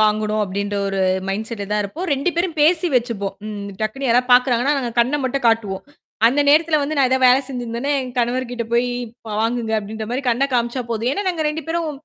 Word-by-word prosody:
வாங்ணும் 215 0 +2
அப்டின்ற 200 +1 -3
ஒரு 195 0 -1 0.3
மைண்ட்செடல 210 +1 -4
தான் 210 0 +1
இருப்போம். 320 - -5
2 280 +6 +1
பேரும் 345 -2 -1
பேசி 335 +3 +4
வெச்சுப்போம். 225 -5 -1
ம். 205 -1 -6
டக்குன்னு 250 +5 -2
யாராது 250 +2 +2
பாக்கிறாங்கனா 250 +2 +4
நாங்க 240 -3 -3
கண்ண 260 +5 +1
மட்டும் 260 0 -2
காட்டுவோம். 210 -4 0 0.5
அந்த 280 +4 +1
நேரத்தில 310 +1 +4
வந்து 295 +2 -2
நான் 265 -2 +4
ஏதாது 260 0 +2
வேல 250 - +7
செஞ்சிருந்தேன்னா 245 +2 -3
என் 255 -2 -5
கணவர்ட்ட 245 0 -1
போய் 240 +1 +2 0.4
ப - - -6
வாங்குங்க 225 -1 -1
அப்டின்ற 215 +1 -6
மாரி 265 +3 -2
கண்ணக் 265 +3 +1
காமிச்சா 240 +1 0
போதும். 230 +3 -1
ஏன்னா 405 +4 -2
நாங்க 325 -4 -1
2 305 0 -4
பேரும் 330 -1 -1
245 Hz, 195 wpm, -20 LUFS, 220-275 Hz, 0.5 s, வேல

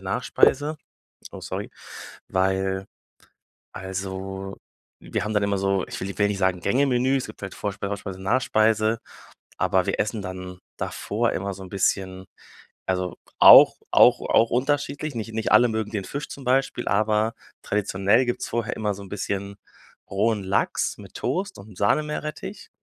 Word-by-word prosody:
Nachspeise. 145 +3 +2 0.5
Oh, - - -9
sorry. - - -5 0.6
Weil, 95 +1 0 0.9
also, 95 +1 -5 0.4
wir - - -3
haben 105 0 -3
dann 105 - +2
immer 100 -1 0
so, 95 -1 +1
ich - - -6
will 95 - -3
ni 100 - -7
will 100 -1 +3
nicht 100 -1 -3
sagen 95 -2 +1
Gänge-Menü. 130 +4 +2
Es 130 - -4
gibt 105 - -12
halt 95 - -5
Vorspeise, 100 -1 -4
Hauptspeise, 95 -2 -5
Nachspeise, 110 0 +2 0.6
aber - - +2
wir - - -2
essen 110 0 -1
dann 90 0 -7 0.2
davor - - -1
immer 100 +1 -3
so 95 - -11
'n 95 - -10
bisschen, 95 -1 -1 0.6
also, 90 -1 -1 0.2
auch - - +10
auch - - +6
auch 115 +1 +3
unterschiedlich. 145 +3 -1
Nicht 115 0 -5
nicht 110 0 -1
alle 125 - +7
mögen 110 -1 -2
den 105 -4 -3
Fisch 145 +2 -5
zum 140 - -9
Beispiel, 130 -1 +1
aber 110 +2 +1 0.3
traditionell 100 +4 +1
gibt's 120 - -2
vorher 115 -2 -2
immer 105 -2 -1
so 100 - -10
'n 100 - -11
bisschen 100 0 -4 0.5
rohen 105 +1 +1
Lachs 95 +1 0
mit - - -13
Toast 195 +2 -2
und 100 -1 -13
Sahnemeerrettich. 150 +8 -2
100 Hz, 155 wpm, -24 LUFS, 95-115 Hz, 0.9 s, auch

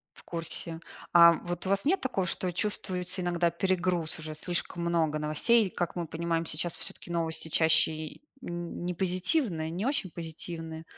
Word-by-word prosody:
В - - -15
курсе. 165 -1 -4 0.3
Ам, 170 -1 +8
вот 175 +1 -4
у - - -1
вас 195 0 +2
нет 370 +6 +3
такого, 225 -8 -1
что 185 - -1
вы 180 - -2
чувствуете 185 -2 -2
иногда 175 -1 +2
перегруз 175 -2 0
уже, 155 -1 -6
слишком 170 +1 -3
много 160 -3 +1
новостей, 175 +10 +3
и, - - -5
как 175 -1 -2
мы 170 -2 -2
понимаем, 165 +1 -1
сейчас 160 +2 0
всё-таки - - -7
новости 160 -1 -1
чаще 160 0 +4
и 155 - -7 0.2
нь 175 0 -5
не 180 - -1
позитивные, 185 - +1
не 180 +6 -3
очень 265 -9 0
позитивные. 165 -1 -6
170 Hz, 175 wpm, -29 LUFS, 160-185 Hz, 0.3 s, Ам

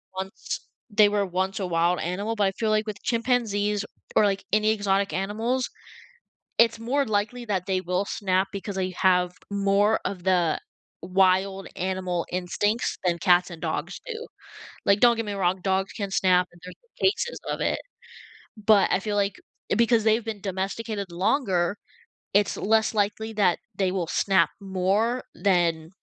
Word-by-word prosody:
once 190 0 -5 0.2
they 210 0 +5
were 205 -1 +1
once 190 +2 -2
a 190 - -2
wild 170 +1 +1
animal, 200 +6 -2
but 205 -2 +2
I 195 - 0
feel 220 +1 -1
like 215 0 +1
with 205 -2 -5
chimpanzees 215 -4 0 0.3
or, - - +5
like, 195 -1 0
any 215 +1 +3
exotic 200 -2 0
animals, 225 +6 -1 0.9
it's 230 -1 +4
more 270 +5 +1
likely 215 +3 -1
that 190 -4 -1
they 185 -1 0
will 180 +2 -1
snap 190 -1 0
because 200 0 -5
they 185 -1 -1
have 180 0 +2 0.2
more 200 +2 +2
of 180 -3 -4
the 180 -4 +2 0.4
wild 190 +1 +2
animal 185 -2 -2
instincts 195 +5 -1
than 175 -2 +1
cats 180 -1 +4
and 165 - -9
dogs 165 +2 -3
do. 465 -1 -5 0.6
Like, 200 +1 +4
don't 240 -1 +6
get 225 -1 -3
me 205 - -3
wrong, 185 -1 0
dogs 190 0 0
can 200 -3 -4
snap 180 -2 +3
and 175 - -19
there's 180 - -9
been 470 -4 0
cases 475 +3 -4
of - - -3
it. - - 0 0.8
But 210 -1 +4
I - - +2
feel 210 -1 -2
like 200 -1 0 0.4
because 230 -1 +3
they've 220 +1 +3
been 220 -3 -5
domesticated 195 +1 -3
longer, 185 -1 +1 0.6
it's 205 0 +2
less 220 +1 +2
likely 215 +1 -1
that 200 -5 +2 0.2
they 190 -1 +1
will 175 -4 -1
snap 190 -2 +3
more 200 +6 0
than 170 -5 +1
200 Hz, 165 wpm, -25 LUFS, 185-215 Hz, 0.9 s, don't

